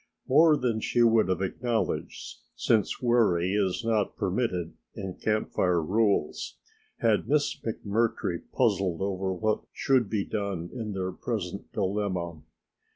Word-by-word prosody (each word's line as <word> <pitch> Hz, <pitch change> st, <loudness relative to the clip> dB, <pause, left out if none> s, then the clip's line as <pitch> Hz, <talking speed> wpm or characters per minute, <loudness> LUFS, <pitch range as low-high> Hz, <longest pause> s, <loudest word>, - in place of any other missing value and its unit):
More 155 Hz, +3 st, +6 dB
than 120 Hz, -5 st, 0 dB
she 120 Hz, +2 st, +2 dB
would 115 Hz, -3 st, +4 dB
have 95 Hz, +1 st, 0 dB
acknowledged, 115 Hz, +4 st, -2 dB, 0.2 s
since 110 Hz, +2 st, +1 dB
worry 105 Hz, -7 st, +3 dB
is 100 Hz, +1 st, 0 dB
not 110 Hz, -3 st, 0 dB
permitted 90 Hz, -4 st, -1 dB, 0.2 s
in 95 Hz, -2 st, -5 dB
Camp 110 Hz, +2 st, -1 dB
Fire 90 Hz, -2 st, +2 dB
rules, 100 Hz, -1 st, 0 dB, 0.4 s
had 110 Hz, -1 st, +2 dB
Miss 145 Hz, 0 st, +2 dB
McMurtry 110 Hz, -5 st, -1 dB
puzzled 95 Hz, -7 st, +1 dB
over 95 Hz, -1 st, -1 dB
what 110 Hz, +4 st, 0 dB
should 130 Hz, -6 st, +2 dB
be 105 Hz, -3 st, -1 dB
done 100 Hz, -5 st, -3 dB
in 110 Hz, -4 st, -4 dB
their 95 Hz, -1 st, -2 dB
present 100 Hz, -2 st, -4 dB
dilemma. 95 Hz, -5 st, -2 dB
105 Hz, 130 wpm, -28 LUFS, 95-115 Hz, 0.4 s, More